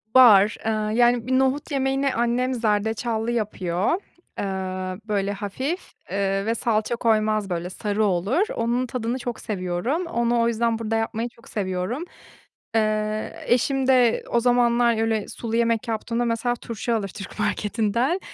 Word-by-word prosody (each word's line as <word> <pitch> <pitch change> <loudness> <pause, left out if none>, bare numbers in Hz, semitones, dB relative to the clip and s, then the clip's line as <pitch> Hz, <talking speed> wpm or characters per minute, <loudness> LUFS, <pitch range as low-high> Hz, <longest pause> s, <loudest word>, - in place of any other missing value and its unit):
Var, 215 -5 +7
eee, 225 - +2 0.3
yani, 240 -1 +3
bir 260 0 +3
nohut 265 +4 0
yemeğini 270 0 +1
annem 240 +2 +1
zerdeçallı 220 0 0
yapıyor, 190 -5 -1 0.5
eee, - - -1 0.6
böyle, 200 -2 0
hafif, 260 - -4 0.2
eee, 195 0 0
ve 230 +1 0
salça 225 0 0
koymaz, 215 -3 +1
böyle, 175 0 -2
sarı 210 +3 -1
olur. 200 - +1
Onun 240 +2 0
tadını 245 0 -2
çok 240 -1 -4
seviyorum, 200 - -2
onu 235 -6 +1
o 230 - +3
yüzden 230 0 0
burada 225 0 -1
yapmayı 225 +1 -1
çok 230 -1 -19
seviyorum. 190 - -2 0.7
Eee, 215 0 -1
eşim 260 +2 +2
de 250 -3 +4
o 235 - +3
zamanlar 240 -1 +3
öyle 225 -2 0
sulu 230 -1 -4
yemek 230 -1 +1
yaptığımda 230 +1 -1
mesela 235 +1 0
turşu 235 0 -4
alır 210 -3 -1
Türk 195 +2 -9
marketinden, 215 - 0
230 Hz, 145 wpm, -24 LUFS, 210-245 Hz, 0.7 s, Var